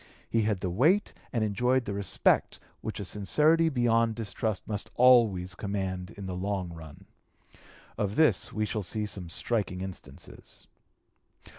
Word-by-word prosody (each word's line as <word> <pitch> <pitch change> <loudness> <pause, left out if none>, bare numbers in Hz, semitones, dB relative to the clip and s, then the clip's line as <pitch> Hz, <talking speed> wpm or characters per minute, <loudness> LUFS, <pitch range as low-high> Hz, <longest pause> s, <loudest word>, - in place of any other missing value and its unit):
He 115 - +1
had 105 -3 0
the 90 - -2
weight 155 - +3 0.2
and 115 -4 0
enjoyed 125 +5 +1
the 100 - -3
respect 100 -2 +1 0.2
which 110 - -5
a 100 - -4
sincerity 155 - +3
beyond 115 -4 +2
distrust 110 -1 -3
must 105 -2 -4
always 115 -8 +5
command 95 -1 -3
in 100 - -7
the 95 - -4
long 95 -1 -3
run. 80 -3 -12 0.9
Of 105 0 -1
this 150 - +3
we 110 0 -1
shall 105 0 -3
see 105 +3 -2
some 95 -4 -5
striking 95 -1 -2
instances. 90 -8 -9
105 Hz, 145 wpm, -28 LUFS, 95-115 Hz, 0.9 s, always